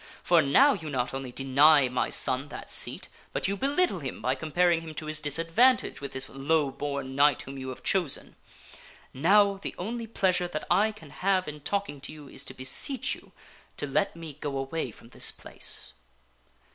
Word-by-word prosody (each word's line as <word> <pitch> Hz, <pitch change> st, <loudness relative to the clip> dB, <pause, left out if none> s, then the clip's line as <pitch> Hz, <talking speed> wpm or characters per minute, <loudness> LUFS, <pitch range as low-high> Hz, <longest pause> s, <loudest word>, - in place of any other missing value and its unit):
For 170 Hz, -2 st, +5 dB
now 260 Hz, -, +5 dB
you 160 Hz, -8 st, -6 dB
not 125 Hz, -3 st, -1 dB
only 135 Hz, -2 st, -5 dB
deny 135 Hz, +2 st, +5 dB
my 125 Hz, 0 st, -1 dB
son 130 Hz, +2 st, +1 dB
that 145 Hz, -, -9 dB
seat, -, -, -3 dB, 0.3 s
but -, -, 0 dB
you 200 Hz, -, 0 dB
belittle 280 Hz, -, +1 dB
him 135 Hz, -4 st, -5 dB
by 130 Hz, -, +1 dB
com 155 Hz, +4 st, -7 dB
paring 175 Hz, 0 st, +3 dB
him 160 Hz, -1 st, -9 dB
to 155 Hz, -, -4 dB
his 155 Hz, 0 st, 0 dB
disadvantage 165 Hz, -, +2 dB
with 140 Hz, -, -5 dB
this 130 Hz, 0 st, +2 dB
low 145 Hz, +1 st, 0 dB
born 140 Hz, -1 st, -4 dB
knight 145 Hz, +1 st, +4 dB
whom 135 Hz, 0 st, -8 dB
you 130 Hz, 0 st, -5 dB
have 130 Hz, -, -8 dB
chosen. 180 Hz, -7 st, -1 dB, 0.8 s
Now, 200 Hz, +8 st, +4 dB
the -, -, -5 dB
only 230 Hz, +5 st, -4 dB
pleasure 185 Hz, -5 st, +1 dB
that 155 Hz, -3 st, -5 dB
I 205 Hz, +5 st, +4 dB
can 160 Hz, -9 st, -14 dB
have 190 Hz, -1 st, +1 dB
in 150 Hz, 0 st, -6 dB
talking 195 Hz, -4 st, -2 dB
to -, -, -5 dB
you 150 Hz, -2 st, -11 dB
is -, -, -4 dB
to -, -, -7 dB
beseech 135 Hz, -, 0 dB
you -, -, -12 dB, 0.5 s
to -, -, -2 dB
let 195 Hz, +8 st, 0 dB
me 165 Hz, -3 st, -8 dB
go 145 Hz, -2 st, -3 dB
away 135 Hz, +2 st, -3 dB
from 115 Hz, +1 st, -15 dB
this -, -, +2 dB
place." -, -, -3 dB
155 Hz, 195 wpm, -28 LUFS, 135-190 Hz, 0.8 s, For